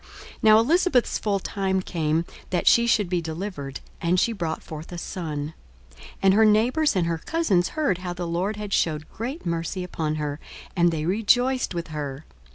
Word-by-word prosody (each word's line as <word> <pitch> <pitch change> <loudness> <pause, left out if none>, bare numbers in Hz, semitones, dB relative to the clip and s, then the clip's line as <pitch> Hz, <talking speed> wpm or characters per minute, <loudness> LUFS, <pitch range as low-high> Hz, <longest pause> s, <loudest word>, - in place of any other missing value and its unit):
42:001:057 - - -21 0.3
Now 215 -1 +7
Elisabeth's 280 +2 +3
full 205 -2 0
time 190 0 -1
came 160 -1 0 0.2
that 180 - -1
she 235 0 +5
should 215 -4 +3
be 175 -1 0
delivered; 160 -4 -5 0.2
and 175 +2 +2
she 230 - +2
brought 170 -6 -3
forth 155 +2 -8
a 175 - -6
son. 155 -4 -4 0.5
42:001:058 - - -14 0.2
And 190 0 +6
her 220 +2 +5
neighbours 235 +7 +3
and 180 -3 +2
her 165 0 -1
cousins 200 - +1
heard 285 - 0
how 180 -1 -4
the 175 0 -4
Lord 180 +5 -1
had 210 -1 -5
shewed 155 -2 0
great 250 - -5
mercy 170 +2 -2
upon 160 -3 -2
her; 150 -1 -3 0.4
and 175 -1 +4
they 155 -1 -2
rejoiced 245 +4 +2
with 170 -1 -4
her. 145 -1 -5
180 Hz, 185 wpm, -25 LUFS, 160-215 Hz, 0.5 s, Now